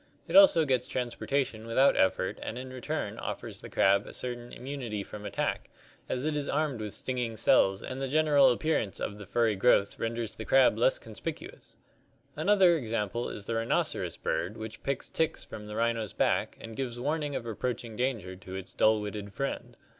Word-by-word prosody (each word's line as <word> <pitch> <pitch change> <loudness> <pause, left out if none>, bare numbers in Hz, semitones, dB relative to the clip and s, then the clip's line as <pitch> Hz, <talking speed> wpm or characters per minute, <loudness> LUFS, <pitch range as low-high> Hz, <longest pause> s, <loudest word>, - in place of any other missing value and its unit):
It - - -3
also 290 - +8
gets 130 -3 +1
transportation 125 -2 -2
without 130 +4 +4
effort 95 0 +1
and 115 - -5
in 130 +1 -6
return 130 -2 -4
offers - - -5
the - - -9
crab 100 +1 +3
a - - -9
certain 120 -1 -5
immunity 125 -5 -5
from 105 +1 -8
attack, - - -2 0.4
as 130 +2 -1
it 155 -1 0
is 145 -1 -1
armed 150 -6 0
with 105 -2 -5
stinging 120 -3 -3
cells 95 -3 +4
and 130 +1 -5
the 135 - 0
general 145 -2 +5
appearance 120 -6 0
of 105 0 -4
the 100 - -9
furry 115 -1 +2
growth 100 -1 +3
renders 115 -1 -2
the 110 - -7
crab 135 +2 +5
less - - +3
conspicuous - - -7
(see - - -19 0.5
Fig. - - -37
4). - - -5
Another 190 -5 +5
example 115 -2 -2
is 100 - -7
the 115 - -2
rhinoceros 115 +1 0
bird 100 +6 -2
which 110 0 -7
picks 140 -1 -2
ticks 160 -1 -1
from 105 -1 -9
the 105 - -6
rhino's 115 -2 0
back - - +1
and 115 -1 -9
gives 120 -2 -3
warning 145 +1 -1
of 115 - -3
approaching 115 0 -3
danger 115 -7 -2
to 95 0 -9
its 95 0 -7
dull 110 0 +3
witted 105 -1 -5
friend. 140 - -4
120 Hz, 190 wpm, -29 LUFS, 105-135 Hz, 0.5 s, also